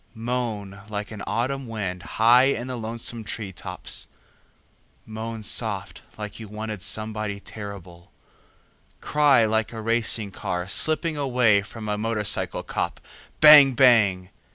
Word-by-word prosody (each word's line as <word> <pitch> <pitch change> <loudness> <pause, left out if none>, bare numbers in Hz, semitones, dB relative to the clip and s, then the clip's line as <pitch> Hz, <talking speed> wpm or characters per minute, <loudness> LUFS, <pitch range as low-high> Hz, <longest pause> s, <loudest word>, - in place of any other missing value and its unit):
Moan 110 -4 -4
like 105 0 -5
an 105 -2 -8
autumn 130 +3 -2
wind 100 -5 -4 0.2
high 120 +3 +6
in 125 -3 0
the 130 0 -5
lonesome 115 0 -4
tree 105 -2 -6
tops, - - -5 1.0
moan 110 0 -6
soft 105 -2 -3 0.2
like 105 0 -7
you 110 - -8
wanted 105 -1 -6
somebody 105 0 -3
terrible, 100 -5 -10 0.9
cry 145 -6 +3
like 110 0 0
a 115 - -7
racing 110 -2 0
car 90 -1 -4
slipping 155 - +2
away 125 -7 +3
from 110 +2 -9
a 105 0 -2
motorcycle 110 -2 0
cop, - - -3 0.4
bang 150 -3 +9
bang! 110 -8 +4
110 Hz, 130 wpm, -24 LUFS, 105-120 Hz, 1.0 s, bang